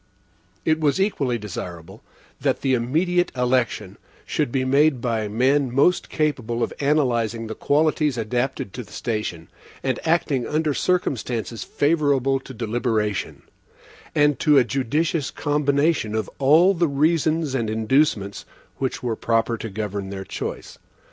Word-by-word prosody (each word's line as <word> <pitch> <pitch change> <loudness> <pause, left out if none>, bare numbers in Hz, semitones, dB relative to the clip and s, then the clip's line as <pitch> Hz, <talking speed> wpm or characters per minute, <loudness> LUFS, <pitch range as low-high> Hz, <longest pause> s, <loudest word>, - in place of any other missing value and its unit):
It 155 0 +2
was 150 +3 +1
equally 140 - 0
desirable, 95 -2 -7 0.4
that - - 0
the 135 - +1
immediate 170 +9 +1
election 125 -6 0 0.3
should 150 -6 -1
be 130 0 0
made 140 +1 +3
by 115 -3 -1
men 130 +5 +2
most 140 +8 +2
capable 125 -7 -1
of - - -2
analyzing 120 -6 +1
the 110 - -5
qualities 150 0 +1
adapted 120 -2 -2
to 125 - -6
the - - -16
station, 105 -8 -3 0.4
and 130 -2 -1
acting 150 -6 +1
under 155 -1 0
circumstances 125 - -1
favorable 145 -3 +1
to 135 - -12
deliberation, 110 -3 -2 0.7
and 145 -3 +3
to 150 -1 +4
a 130 - +7
judicious 140 +5 -1
combination 145 -4 +1
of 110 - -2
all 160 +8 +5
the 170 -2 +1
reasons 155 +1 +1
and 115 -5 -1
inducements 110 -2 +1 0.3
which 130 -1 -3
were 120 -2 -1
proper 115 +1 +1
to 115 0 -6
govern 100 -1 -4
their 95 -1 -6
choice. - - -6
130 Hz, 135 wpm, -23 LUFS, 115-150 Hz, 0.7 s, a